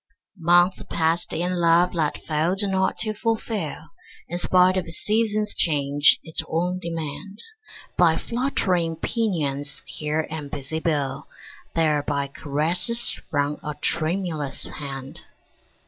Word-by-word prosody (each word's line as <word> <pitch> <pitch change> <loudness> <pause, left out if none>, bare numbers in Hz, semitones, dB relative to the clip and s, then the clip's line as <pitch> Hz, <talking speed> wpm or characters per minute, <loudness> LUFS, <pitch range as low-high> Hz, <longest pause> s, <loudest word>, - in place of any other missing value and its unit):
Months 175 +2 +4
passed 165 +1 0
in 180 +2 -1
love 170 +1 +4
that 155 -4 0
failed 165 +6 +1
not 190 -1 +1
to 215 -1 -1
fulfil, 215 -6 -2 0.4
In 175 +1 -3
spite 185 +1 +4
of 185 -2 -1
season's 210 - 0
change, 145 -2 +3
its 160 - +3
own 180 +3 -1
demand, 170 +3 -5 0.6
By 165 -2 +5
fluttering 185 -10 0
pinions 155 - -2
here 155 +1 -2
and 150 -3 -5
busy 145 +2 -4
bill; 145 -3 -1 0.5
There 155 -3 +3
by 140 -1 -2
caresses 160 - +1 0.2
from 145 0 0
a 150 0 -4
tremulous 155 -1 -1
hand. 135 -2 -7
165 Hz, 115 wpm, -24 LUFS, 150-185 Hz, 0.6 s, By